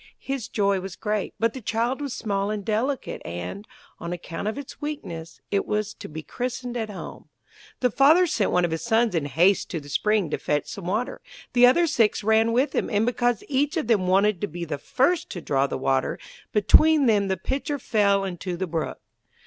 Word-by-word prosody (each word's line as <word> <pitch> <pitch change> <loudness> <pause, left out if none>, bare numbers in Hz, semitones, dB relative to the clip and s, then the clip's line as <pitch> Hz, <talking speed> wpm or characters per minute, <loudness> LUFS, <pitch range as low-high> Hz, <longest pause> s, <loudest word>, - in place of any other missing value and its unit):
His 270 -4 -3
joy 200 -5 +1
was 190 -1 -7
great, 210 -2 -2
but 230 0 +1
the 260 - -7
child 230 +5 -1
was 285 -2 -3
small 200 -3 -2
and 210 -2 -3
delicate, 240 +5 -1
and, 90 - -6 0.3
on 170 - -5
account 175 +2 -5
of 220 - -2
its 285 -2 -9
weakness, 170 - -6
it 200 - 0
was 210 0 -1
to - - -10
be 155 +1 -7
christened 245 +3 -4
at 225 -3 -2
home. 200 - -9 0.5
The 250 -2 +3
Father 310 - +5
sent 230 - 0
one 180 -1 +2
of 170 - -3
his 160 - -2
sons 230 -1 +2
in 160 -4 0
haste 170 +8 +3
to 170 - -3
the 145 -1 -12
spring 205 +2 +1
to - - -1
fetch 150 0 0
some 195 -3 -7
water; 215 +7 -2 0.3
the 245 0 +7
other 340 +8 +4
six 225 -9 +2
ran 220 +2 +3
with 255 +5 +1
him, - - 0
and 210 0 +2
because 245 -2 0
each 290 +4 0
of 315 - 0
them 210 -5 +2
wanted 195 0 +3
to 205 - 0
be 170 0 -6
the 145 -3 -4
first 295 - +1
to 175 - -5
draw 140 -4 +1
the - - -3
water, 130 0 0 0.3
between 285 +9 +5
them 205 -4 +3
the 190 -1 0
pitcher 285 +2 -2
fell 200 -6 +2
into 180 -1 -4
the 190 - -1
brook. 165 -2 -3
210 Hz, 210 wpm, -25 LUFS, 180-245 Hz, 0.5 s, the